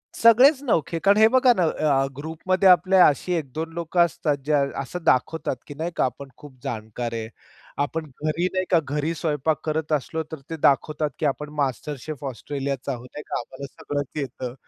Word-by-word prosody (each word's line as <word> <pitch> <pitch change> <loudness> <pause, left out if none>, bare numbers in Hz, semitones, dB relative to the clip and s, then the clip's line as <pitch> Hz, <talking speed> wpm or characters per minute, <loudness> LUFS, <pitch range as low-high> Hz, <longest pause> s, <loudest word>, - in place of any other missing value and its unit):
सगळेच 255 +5 +6
नवखे. 165 - 0
कारण 200 +3 +4
हे 220 0 +7
बघा 255 -1 +6
ना, 180 - +3
अ, 145 -4 +1
ग्रुपमध्ये 180 +5 +1
आपल्या 185 +1 +6
अशी 155 +5 0
1-2 160 +1 -3
लोकं 170 +1 -2
असतात, 150 -2 -1
जे 150 - +1 0.3
असं 165 +6 -5
दाखवतात, 135 +2 +1
की 145 - -7
नाही 165 +4 -4
का - - +2
आपण 135 +2 -5
खूप 145 -3 -13
जाणकार 115 +1 -4
आहे. 110 -1 -4 0.5
आपण 155 +2 -2 0.2
घरी 165 +4 +1
नाही 185 0 0
का, 170 -3 +5
घरी 150 +4 -2
स्वयंपाक 150 -1 0
करत 155 0 -2
असलो, 155 +3 -1
तर 160 - -6
ते 165 - -4
दाखवतात 150 +2 +1
की 155 - 0
आपण 150 +1 -1
मास्टर 140 +2 -2
शेफ 145 0 -7
ऑस्ट्रेलियाचा 140 +1 -4
आहोत 125 0 -6
नाही 150 - -6
का, - - -2
आम्हाला 130 +3 -8
सगळंच 145 -2 -4
येतं. 125 -2 -5
150 Hz, 185 wpm, -24 LUFS, 140-170 Hz, 0.5 s, हे